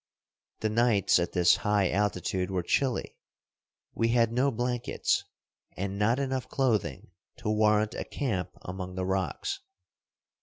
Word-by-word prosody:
The 110 - +1
nights 110 -5 +3
at 85 - -2
this 90 -1 +5
high 105 -3 +1
altitude 95 -2 0
were 95 -2 -1
chilly. 130 +7 0 0.8
We 115 - +1
had 115 -1 +3
no 125 +4 +2
blankets, 120 -1 -1 0.5
and 100 +1 -3
not 115 +4 +3
enough 130 -3 -2
clothing 105 - 0 0.3
to 105 - -2
warrant 105 0 +3
a - - -3
camp 110 -11 -2
among 90 0 -6
the 95 0 -2
rocks. 95 - -2
105 Hz, 130 wpm, -29 LUFS, 95-120 Hz, 0.8 s, this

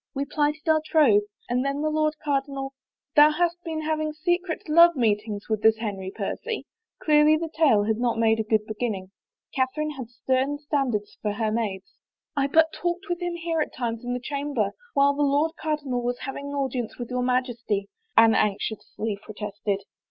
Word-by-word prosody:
We 275 +1 -1
plighted 300 +2 -1
our 315 -1 +4
troth. 290 -10 +4 0.3
And 250 +1 0
then 275 +2 -1
the 310 - +1
Lord 310 0 +1
Cardinal 275 -2 -2
— - - -68
" - - -68
" 280 - -59
Thou 295 +1 +8
hast 345 +2 0
been 320 -2 -3
having 310 0 -1
secret 350 +2 -1
love 335 +2 +7
meetings 210 -3 0
with 220 -2 -1
this 220 0 +5
Henry 200 -4 -4
Percy? 455 - -4 0.2
" 450 - -65
Clearly 300 0 +5
the 325 0 -4
tale 275 -11 +4
had 220 +1 0
not 240 -1 0
made 225 -1 +3
a - - +1
good 215 0 +1
beginning. 210 -4 -4 0.4
Catherine 290 +4 0
had 260 -5 -7
stem 260 +4 0
standards 275 -8 -2
for 210 -1 -1
her 215 0 -1
maids. 215 -4 -3 0.2
" - - -64
I 280 -1 +2
but 320 +2 +4
talked 350 +2 -2
with 350 0 -2
him 350 -1 -2
here 335 -1 -1
at - - -3
times 230 -1 -3
in 245 0 -2
the - - -2
chamber 280 -5 -2 0.2
while 280 0 +5
the 290 - -2
Lord 290 +3 +2
Cardinal 290 -6 -2
was 245 +1 -1
having 275 +1 -5
audience 265 -5 -3
with 240 0 -6
your 250 0 0
Highness," 250 -2 0 0.5
Anne 225 0 +7
anxiously 210 0 -1
protested. 205 -2 -4
270 Hz, 195 wpm, -25 LUFS, 225-305 Hz, 0.5 s, Thou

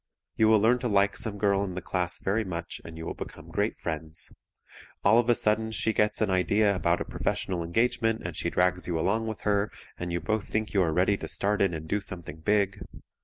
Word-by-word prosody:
You 110 - +4
will 110 -1 +6
learn 115 +4 +3
to 125 - -2
like 100 -2 +3
some 105 0 -1
girl 100 -1 +2
in 95 -3 -4
the - - -2
class 90 -2 -1
very 110 +4 0
much 85 -4 -5
and 80 -1 -10
you 80 - -6
will - - -3
become - - -9
great - - -1
friends. 80 0 -3 0.7
All 110 +4 +6
of 120 0 +1
a 120 - +5
sudden 110 +1 +2
she 110 0 0
gets 105 0 +1
an 105 -3 +2
idea 100 +2 +3
about 85 -1 +1
a - - -2
professional 90 -3 -2
engagement 115 +5 +1
and - - -4
she - - -1
drags 90 0 +1
you 85 -2 -1
along 110 +7 0
with 110 -2 -5
her, 105 0 +1 0.3
and 85 0 -3
you 85 - -1
both 110 +1 -2
think 110 0 -2
you 100 - +3
are 85 -3 +2
ready 95 +5 +2
to - - -6
start 105 +1 +1
in 95 -4 +2
and 80 0 -7
do 105 - 0
something 90 -6 -5
big. 100 +3 +1
100 Hz, 230 wpm, -28 LUFS, 90-110 Hz, 0.7 s, will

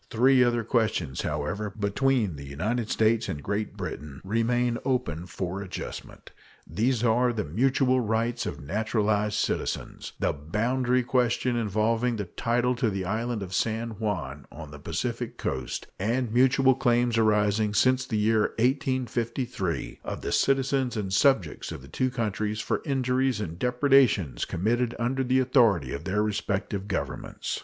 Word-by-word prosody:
Three 130 +2 +5
other 120 -1 +1
questions, 105 - 0
however, 75 +9 -2
between 105 - +1
the 70 - -9
United 110 - -2
States 110 +1 +2
and 70 -2 -4
Great 105 +1 -3
Britain 75 -2 -6
remain 115 +4 +1
open 120 - -1
for 95 +1 -4
adjustment. 100 - -8 0.3
These 120 +2 0
are 120 +2 +3
the 110 -3 -2
mutual 130 - +2
rights 115 +1 -1
of - - -5
naturalized 105 +4 0
citizens, - - -2
the - - +1
boundary 120 - 0
question 125 0 +1
involving 115 +2 +1
the 105 -2 -3
title 120 +6 0
to 120 -3 +1
the 95 -2 -3
island 110 +2 -2
of 95 -1 -7
San 115 +4 -1
Juan, 85 - -4
on 80 -2 -9
the 75 - -10
Pacific - - -3
coast, 65 -2 -3
and 115 +3 0
mutual 130 +1 +5
claims 120 -2 +2
arising 105 -1 +2
since 130 +2 +3
the 115 -4 -2
year 110 0 +2
1853 125 - -1
of - - -5
the - - -3
citizens 135 -2 +1
and 95 -3 -3
subjects 110 - +2
of - - -7
the - - -12
two 130 - 0
countries 110 -3 -2
for - - -1
injuries 130 -3 +1
and 85 -5 -5
depredations 125 - +3
committed 115 +7 0
under 125 +4 0
the 130 +1 +2
authority 120 - +3
of 70 +3 -6
their 100 +2 +1
respective 100 -1 -2
Governments. 100 - -3
115 Hz, 150 wpm, -27 LUFS, 100-125 Hz, 0.3 s, Three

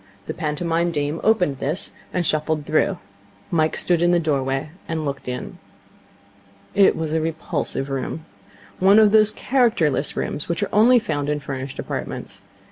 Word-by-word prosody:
The - - -4
pantomime 165 +2 -1
dame 150 -1 -2
opened 180 -11 +2
this, 155 +7 -2 0.2
and 180 -1 -1
shuffled 155 -1 0
through. 175 +5 +1 0.5
Mike 160 -2 +1
stood 175 -2 +1
in 175 - +4
the 175 0 +4
doorway, 135 -2 -1 0.2
and 160 -2 -2
looked 140 -2 -4
in. 125 0 -5 1.1
It 200 -1 +5
was 160 -1 -3
a 160 - +1
repulsive 160 -3 -3
room. 135 +3 -4 0.5
One 195 +3 +6
of 215 -2 +6
those 215 -1 +6
characterless 215 - +1
rooms 145 - -3
which 170 0 -1
are - - -4
only 235 +4 +6
found 145 -10 -1
in 150 0 0
furnished 135 -1 -6
apartments. - - -5
160 Hz, 155 wpm, -22 LUFS, 145-180 Hz, 1.1 s, One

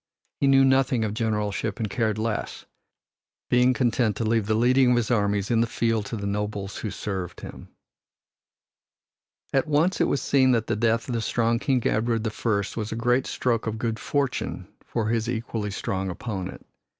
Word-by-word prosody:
He 140 - +2
knew 135 0 +6
nothing 130 -3 +3
of 105 - -2
generalship 105 -2 -1
and 110 - -1
cared 110 0 -1
less, 110 0 -3 0.9
being 125 +1 +5
content 120 -3 +1
to 115 - -2
leave 110 -2 +1
the 110 - +2
leading 125 +3 +4
of 125 - +4
his 120 0 0
armies 100 -2 +1
in 115 -1 +3
the 115 - +2
field 115 -2 0
to - - -4
the 100 - -5
nobles 100 0 -3
who 110 - -4
served 95 -4 -5
him. - - -9 1.9
At 135 +1 +2
once 155 +5 +2
it - - +5
was 140 - +1
seen 130 -2 +3
that 115 -2 +1
the 110 - -1
death 115 +1 +1
of 125 - -3
the 115 - 0
strong 115 +1 +1
King 130 -2 0
Edward 115 0 +1
the 110 - -1
First 105 -3 -1
was 110 -1 -3
a - - -2
great 120 +3 +1
stroke 115 -3 -1
of 110 0 -2
good 115 -1 -2
fortune 140 +1 -2 0.2
for 110 -2 -2
his 115 0 0
equally 115 -3 -3
strong 95 -1 -3
opponent. 95 0 -5
115 Hz, 185 wpm, -25 LUFS, 105-125 Hz, 1.9 s, knew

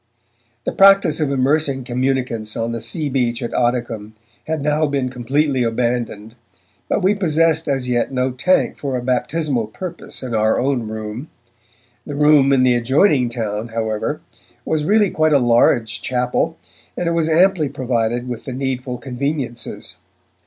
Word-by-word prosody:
The - - -1
practice 195 -5 +5
of 150 -3 0
immersing 140 0 +1
communicants 125 -3 -2
on 115 +1 -2
the 115 -1 -4
sea 130 +7 -3
beach 125 -3 -1
at 120 - -4
Oddicombe 120 -3 -1 0.3
had 160 -2 -2
now 150 +1 +1
been 140 -3 -1
completely 130 +2 0
abandoned, 115 -2 -2 0.6
but - - 0
we 190 +2 +4
possessed 165 -4 +1
as 135 -3 -1
yet 120 0 0
no 130 0 0
tank 160 +9 +1
for 135 -3 -2
a 125 - -5
baptismal 125 0 -1
purpose 170 - -7
in 125 -2 -5
our 110 0 +2
own 130 -4 0
Room. 110 +6 -6 0.8
The 145 - -5
Room 150 -2 +5
in 130 -2 +4
the 125 -1 +4
adjoining 130 - +3
town, 110 -2 -3
however, 110 -2 -3 0.4
was 155 -1 -1
really 205 0 +3
quite 155 -1 +2
a - - +6
large 120 -2 +2
chapel, 125 +6 -1 0.4
and 175 - -1
it - - +1
was 165 -1 +1
amply 170 -2 +3
provided 120 -1 -1
with 120 -2 -6
the 130 - -5
needful 130 -1 -3
conveniences. 130 -1 -4
130 Hz, 155 wpm, -19 LUFS, 120-150 Hz, 0.8 s, a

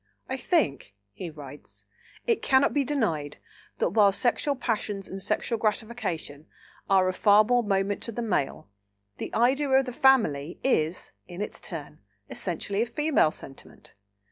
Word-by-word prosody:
"I 260 - -2
think," 200 - 0 0.2
he 175 - -6
writes, 145 -2 -12 0.4
"it 460 -3 +1
cannot 265 +1 +3
be 285 - +2
denied 170 - -1 0.4
that - - 0
while 200 0 +5
sexual 255 +7 0
passions 210 -5 -2
and 195 +1 -7
sexual 230 +4 -1
gratification 205 -9 -3 0.4
are 190 -1 +4
of 185 - -1
far 205 +1 +6
more 245 +2 +2
moment 200 -2 0
to 230 - -4
the 240 +2 -4
Male, 175 - -1 0.5
the - - -5
idea 265 +5 +2
of 265 0 +4
the 250 - -6
family 195 - +3
is, 170 -10 0 0.2
in 175 - -9
its 210 - -4
turn, 150 -4 -8 0.3
essentially 195 +3 -2
a 235 - 0
Female 295 - +2
sentiment. 135 -3 -11
205 Hz, 150 wpm, -27 LUFS, 165-250 Hz, 0.5 s, far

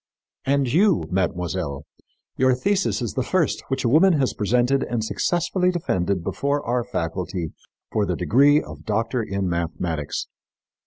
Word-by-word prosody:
And 140 0 +2
you, 190 +1 +3
mademoiselle, 90 -5 -2 0.5
your 130 0 +3
thesis 195 -1 0
is 115 - -3
the 130 - -1
first 170 +3 0
which 135 0 -2
a - - +4
woman 165 +9 +5
has 140 -5 +1
presented 125 +5 +2
and 120 -2 -2
successfully 175 - 0
defended 95 - -1
before 140 +7 -1
our 120 +1 0
faculty 90 -6 -3 0.4
for - - +1
the - - 0
degree 145 +5 +4
of - - -9
doctor 115 +3 -1
in 100 -3 -2
mathematics. 85 -3 -2
120 Hz, 145 wpm, -23 LUFS, 90-145 Hz, 0.5 s, woman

